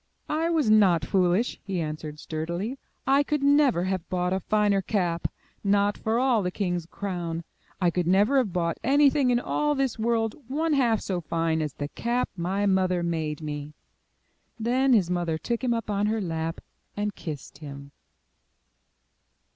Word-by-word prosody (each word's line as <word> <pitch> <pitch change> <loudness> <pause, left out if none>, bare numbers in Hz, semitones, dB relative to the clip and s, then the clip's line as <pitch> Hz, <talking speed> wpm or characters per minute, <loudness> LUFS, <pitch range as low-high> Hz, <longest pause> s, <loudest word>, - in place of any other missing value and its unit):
'1 320 +2 0
was 300 -7 +2
not 195 -7 +5
foolish," 185 +5 +1
he 195 -3 -3
answered 155 -1 -4
sturdily, 170 - -4 0.3
*'I 275 +2 +4
could 295 0 -1
never 280 - +4
have 185 -2 -2
bought 180 0 0
a 190 - 0
finer 205 0 +2
cap, 175 -4 0 0.4
not 200 0 +2
for 220 +1 -1
all 250 -3 +3
the 180 - -1
king's 180 -3 -2
crown. 175 -4 -4 0.4
I 175 -2 +3
could 175 -1 -1
never 205 +9 +4
have 230 -7 0
bought 170 -1 -1
anything 280 0 +4
in 240 -1 +3
all 295 +4 0
this 270 -4 -1
world 225 -1 +1
one 310 +4 0
half 240 -6 +2
so 180 -3 -2
fine 165 0 0
as 150 -3 -3
the 145 - -3
cap 240 +9 -1
my 190 +3 -1
mother 185 -2 +2
made 160 -3 -2
me 150 0 -5 0.8
1" - - -11
Then 255 +3 +3
his 185 -6 +3
mother 175 -3 0
took 235 +8 -3
him 250 - +1
up 230 -1 -1
on 205 +1 +1
her 220 +1 0
lap, 165 -3 -3 0.4
and 205 0 -1
kissed 145 -5 -8
him. 140 -2 -9
195 Hz, 170 wpm, -26 LUFS, 170-235 Hz, 0.8 s, not